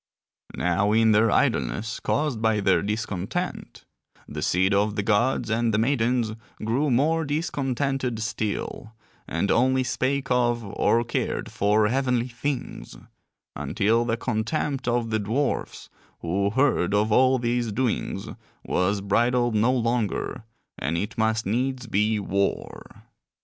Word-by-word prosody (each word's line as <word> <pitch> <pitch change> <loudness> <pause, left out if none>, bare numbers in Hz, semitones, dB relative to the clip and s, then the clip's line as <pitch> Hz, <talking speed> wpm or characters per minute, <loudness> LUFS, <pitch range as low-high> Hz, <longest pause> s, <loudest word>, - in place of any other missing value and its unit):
Now 95 +4 +1
in 110 0 +4
their 110 +2 +4
idleness 110 +1 0
caused 145 -7 -1
by 110 -1 +2
their 95 -2 +3
discontent, 105 -3 -4 0.4
the - - -6
seed 95 +3 +2
of 105 +1 +1
the 105 - -1
gods 115 +2 +1
and 115 +1 +1
the 110 - +1
maidens 120 -1 +1 0.3
grew 130 +7 +1
more 155 +6 +2
discontented 135 -4 -1
still, 110 0 -4 0.3
and 85 +5 -1
only 130 +2 +3
spake 130 +2 -1
of 120 -1 +2
or 115 +3 +1
cared 115 - -3
for 105 +1 +2
heavenly 125 -1 0
things; 120 - -5 0.6
until 115 +3 +1
the 115 -1 -1
contempt 130 +4 -2
of 120 -1 0
the 110 - +1
dwarfs, 115 +8 -2 0.3
who 100 +4 0
heard 110 -6 +2
of 105 +1 +1
all 130 +3 +4
these 120 -1 -1
doings, 120 +2 -2 0.4
was 100 +2 0
bridled 120 +4 +2
no 110 +4 +3
longer 115 -3 -1 0.3
and 80 +6 -1
it 105 +6 -3
must 110 0 0
needs 125 +5 -1
be 105 0 +1
war. 100 0 -3
115 Hz, 130 wpm, -25 LUFS, 105-125 Hz, 0.6 s, in